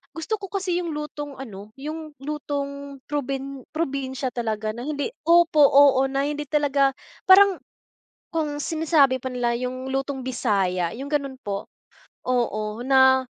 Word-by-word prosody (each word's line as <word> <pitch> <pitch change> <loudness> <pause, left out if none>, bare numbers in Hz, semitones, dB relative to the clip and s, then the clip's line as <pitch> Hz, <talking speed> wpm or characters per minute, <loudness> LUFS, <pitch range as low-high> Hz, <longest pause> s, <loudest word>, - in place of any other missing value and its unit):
gusto 330 +7 -2
ko 390 - -5
kasi 370 -3 -1
yung 335 -2 -4
lutong 295 -2 -6
ano, 210 -4 -9
yung 310 +1 -6
lutong 280 -2 -5
probin 275 -1 -3
probinsya 270 -4 -2
talaga 220 -2 -2
na 240 +2 -6
hindi 290 +5 -2 0.2
opo, 335 -2 +5
oo 275 -1 +6
na 275 +1 0
hindi 295 0 -3
talaga. 280 -2 +2 0.4
Parang 390 0 +7 0.8
kung 300 -3 -1
sinasabi 310 -5 +3
pa - - -2
nila, 240 -1 0
yung 255 +1 -4
lutong 270 0 -2
Bisaya, 195 -8 0
yung 270 +3 -6
gano'n 275 -3 -1
po, 200 -1 -4 0.6
oo 225 -3 -1
na 260 -1 +5
275 Hz, 140 wpm, -24 LUFS, 255-300 Hz, 0.8 s, Parang